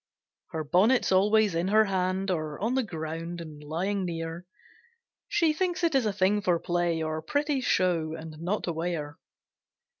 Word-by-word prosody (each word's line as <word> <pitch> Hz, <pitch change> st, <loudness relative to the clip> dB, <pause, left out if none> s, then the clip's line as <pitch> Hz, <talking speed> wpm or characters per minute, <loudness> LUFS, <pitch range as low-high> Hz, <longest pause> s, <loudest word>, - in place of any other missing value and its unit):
Her 160 Hz, -2 st, -4 dB
bonnet's 195 Hz, -, +3 dB
always 205 Hz, +1 st, +4 dB
in 170 Hz, +2 st, 0 dB
her 215 Hz, +2 st, +5 dB
hand, 190 Hz, 0 st, 0 dB
Or 155 Hz, -4 st, -3 dB
on 225 Hz, +5 st, 0 dB
the 265 Hz, -, +2 dB
ground, 165 Hz, -3 st, -5 dB
and 155 Hz, -3 st, -9 dB
lying 185 Hz, +6 st, -1 dB
near; 165 Hz, +1 st, -5 dB, 0.8 s
She 330 Hz, -3 st, +2 dB
thinks 355 Hz, +2 st, -1 dB
it 335 Hz, -2 st, +3 dB
is 260 Hz, -5 st, +3 dB
a -, -, +1 dB
thing 200 Hz, +1 st, +2 dB
for 180 Hz, -3 st, +2 dB
play, 175 Hz, -1 st, 0 dB
Or 155 Hz, 0 st, -2 dB
pretty 285 Hz, -, 0 dB
show, 170 Hz, -8 st, +1 dB
and 160 Hz, -1 st, -8 dB
not 180 Hz, +6 st, -2 dB
to 170 Hz, -, -2 dB
wear. 160 Hz, -3 st, -3 dB
180 Hz, 170 wpm, -28 LUFS, 165-210 Hz, 0.8 s, her